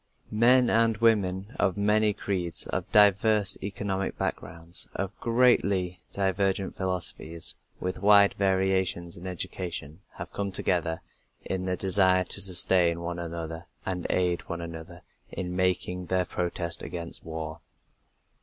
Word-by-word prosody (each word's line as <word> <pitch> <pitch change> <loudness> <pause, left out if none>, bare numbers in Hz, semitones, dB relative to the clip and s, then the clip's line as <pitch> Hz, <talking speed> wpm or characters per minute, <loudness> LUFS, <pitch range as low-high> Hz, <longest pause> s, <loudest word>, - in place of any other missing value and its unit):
Men 120 +3 +5
and 115 -1 +3
women 105 -2 +1
of 95 - +1
many 105 +1 +3
creeds, 90 -4 -3
of - - -4
diverse 105 0 +4
economic 95 -1 -3
backgrounds, 85 +1 0
of 95 +1 -4
greatly 100 -7 +2
divergent 95 0 -1
philosophies, 90 -3 -3 0.3
with 90 0 -4
wide 100 0 +6
variations 95 -3 0
in 90 +2 -9
education, 90 -3 -5
have - - -8
come 100 -1 -3
together 85 -3 0 0.4
in 95 -1 -3
the 90 -1 -1
desire 95 -1 +3
to - - -2
sustain 90 -2 +5
one 85 0 -4
another 85 0 -6 0.2
and 90 -2 -3
aid 90 -1 0
one 85 - -4
another 85 +1 -9 0.3
in 90 -1 -5
making 90 -1 -1
their 95 -1 +1
protest 85 -1 -3
against 85 -2 -5
war. 80 0 -6
95 Hz, 125 wpm, -27 LUFS, 85-100 Hz, 0.4 s, wide